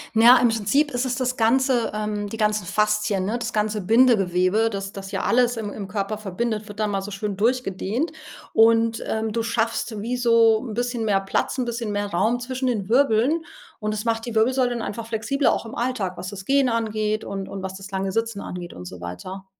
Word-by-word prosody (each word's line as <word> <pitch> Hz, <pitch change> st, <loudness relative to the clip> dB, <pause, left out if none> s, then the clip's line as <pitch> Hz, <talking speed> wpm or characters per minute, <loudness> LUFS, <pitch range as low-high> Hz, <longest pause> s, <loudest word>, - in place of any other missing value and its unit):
Na, 235 Hz, +3 st, +8 dB
im 240 Hz, -1 st, +4 dB
Prinzip 225 Hz, +7 st, +1 dB
ist 245 Hz, +1 st, -1 dB
es 250 Hz, -, -1 dB
das 255 Hz, -1 st, -1 dB
Ganze, 245 Hz, +1 st, +2 dB
ähm 210 Hz, -1 st, -2 dB
die 225 Hz, -, -6 dB
ganzen 210 Hz, -3 st, 0 dB
Faszien, 210 Hz, -1 st, +1 dB
ne? 225 Hz, +5 st, -1 dB
Das 235 Hz, 0 st, -3 dB
ganze 210 Hz, -1 st, 0 dB
Bindegewebe, 215 Hz, -2 st, +3 dB
das 195 Hz, -1 st, -5 dB
das 195 Hz, -1 st, -7 dB
ja -, -, -2 dB
alles 245 Hz, 0 st, +2 dB
im 205 Hz, -2 st, -4 dB
im 200 Hz, -2 st, -6 dB
Körper 205 Hz, +1 st, -3 dB
verbindet, 215 Hz, +2 st, -3 dB
wird 205 Hz, 0 st, -10 dB
da 215 Hz, -, +2 dB
mal 200 Hz, -2 st, -1 dB
so 195 Hz, -, -6 dB
schön 205 Hz, 0 st, -4 dB
durch 245 Hz, +5 st, +1 dB
gedehnt. 210 Hz, -, -2 dB, 0.4 s
Und, 225 Hz, 0 st, +4 dB
ähm, 220 Hz, 0 st, -1 dB
du 230 Hz, -, 0 dB
schaffst 225 Hz, -1 st, -1 dB
wie 240 Hz, +4 st, -2 dB
so 230 Hz, -2 st, +4 dB
'n 225 Hz, -5 st, -6 dB
bisschen 245 Hz, 0 st, -1 dB
mehr 200 Hz, -3 st, +2 dB
Platz, 195 Hz, +6 st, -1 dB
'n 255 Hz, -, 0 dB
bisschen 235 Hz, -2 st, -3 dB
mehr 205 Hz, 0 st, -1 dB
Raum 220 Hz, +8 st, +1 dB
zwischen 260 Hz, +1 st, -3 dB
den 215 Hz, -6 st, -1 dB
Wirbeln 270 Hz, +5 st, +3 dB, 0.4 s
und 215 Hz, -1 st, -2 dB
das 215 Hz, +1 st, -4 dB
macht 225 Hz, 0 st, -1 dB
die 230 Hz, -, -5 dB
Wirbelsäule 250 Hz, +3 st, +3 dB
dann 235 Hz, -2 st, -3 dB
einfach 225 Hz, +2 st, -5 dB
flexibler 235 Hz, +5 st, +1 dB
auch -, -, -2 dB
im 225 Hz, -, -8 dB
Alltag, 235 Hz, -7 st, -2 dB
was 185 Hz, -, -6 dB
das 195 Hz, -1 st, -8 dB
Gehen 275 Hz, -2 st, +3 dB
angeht 215 Hz, -2 st, -1 dB
und 195 Hz, -1 st, -5 dB
und 195 Hz, -1 st, -6 dB
was 190 Hz, 0 st, -5 dB
das 195 Hz, 0 st, -10 dB
lange 195 Hz, -1 st, -2 dB
Sitzen 225 Hz, 0 st, -1 dB
angeht 180 Hz, -3 st, -7 dB
und 90 Hz, -, -9 dB
so 90 Hz, 0 st, -9 dB
weiter. 185 Hz, -, -7 dB
220 Hz, 220 wpm, -23 LUFS, 200-240 Hz, 0.4 s, Na